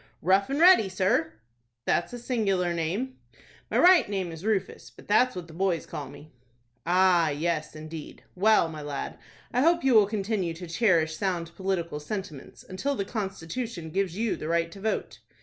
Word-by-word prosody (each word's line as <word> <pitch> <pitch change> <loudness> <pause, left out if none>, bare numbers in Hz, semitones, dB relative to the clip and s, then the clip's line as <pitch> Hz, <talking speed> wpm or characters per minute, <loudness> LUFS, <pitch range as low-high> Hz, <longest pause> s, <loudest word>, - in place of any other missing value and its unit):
"Rough 190 +5 +3
and 275 +2 -1
Ready, 345 - +7
sir." 185 - +1 0.5
"That's 170 - +1
a 245 - -6
singular 200 -8 0
name." 190 +11 -3 0.5
"My - - 0
right 360 - +6
name 190 -4 -2
is 165 +1 -9
Rufus; 200 -3 -2
but - - -17
that's 245 +4 +3
what 180 -2 -6
the 165 - -13
boys 175 -1 0
call 145 - -7
me." 145 +2 -13 0.6
"Ah, 180 -2 +4
yes, 155 +1 -2
indeed. 155 0 -9
Well, 210 -1 +4
my 155 -2 -7
lad, 145 -1 -5 0.3
I 250 - +2
hope 340 +3 +3
you 265 -1 +3
will 215 -3 +6
continue 200 -4 -2
to 180 +2 -8
cherish 165 -3 +2
sound 175 -3 -2
political 175 -5 -2
sentiments 155 -3 -7
until 275 +10 -2
the 200 - -2
constitution 195 -2 -5
gives 190 0 -1
you 225 -1 0
the 155 - -6
right 170 0 0
to 195 - -11
vote." 220 +1 -2
185 Hz, 175 wpm, -27 LUFS, 165-215 Hz, 0.6 s, Ready